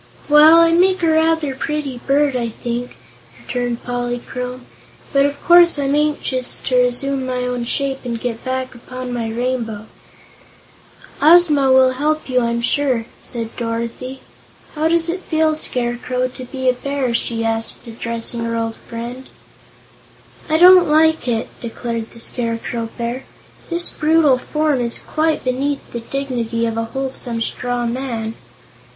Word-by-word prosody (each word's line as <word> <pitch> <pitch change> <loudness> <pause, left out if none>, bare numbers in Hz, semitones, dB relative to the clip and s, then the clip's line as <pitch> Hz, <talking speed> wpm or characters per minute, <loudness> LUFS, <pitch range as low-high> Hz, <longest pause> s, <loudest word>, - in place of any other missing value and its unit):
"Well, 305 +2 +8
I 335 0 +5
make 370 +2 +3
a 330 - +4
rather 320 -2 +2
pretty 280 -2 -3
bird, 280 0 +2
I 235 -2 -1
think," 240 +2 -5 0.4
returned 245 -1 -3
Polychrome, 245 +1 -4 0.5
"but 275 0 +4
of 285 0 -6
course 345 -2 +6
I'm 280 -1 0
anxious 290 -4 0
to 255 - 0
resume 250 +2 +1
my 255 -1 -2
own 250 -1 -2
shape 270 +2 -1
and 235 -2 -3
get 230 -1 -4
back 260 0 -3
upon 255 +1 -7
my 230 -2 -2
rainbow." 230 -2 -3 1.4
"Ozma 300 -4 +6
will 260 0 +6
help 305 +4 -1
you, 255 -1 +2
I'm 235 0 -1
sure," 255 -3 +1 0.2
said 230 -2 -4
Dorothy. 235 +3 -4 0.5
"How 310 +1 0
does 335 0 +1
it 345 +3 -2
feel, 315 -3 +1
Scarecrow, 250 -3 -2
to 255 0 -9
be 260 +1 -4
a 255 - +5
Bear?" 270 -1 -2
she 230 -1 -1
asked, 225 0 -1
addressing 230 0 -3
her 230 0 -2
old 225 -1 -2
friend. 240 +3 -8 1.2
"I 315 - +3
don't 360 0 +8
like 315 -1 +3
it," 230 -2 0
declared 230 -1 -4
the 230 - -14
Scarecrow 230 -1 -3
Bear. 240 +2 -4 0.4
"This 345 0 +2
brutal 305 -4 +3
form 300 0 0
is 235 -1 -2
quite 315 0 -1
beneath 275 +3 -2
the 235 - -3
dignity 235 -2 -2
of 225 -1 -2
a 230 0 -1
wholesome 260 -2 -3
straw 245 +1 -2
man." 235 -2 -3
255 Hz, 145 wpm, -19 LUFS, 235-290 Hz, 1.4 s, Well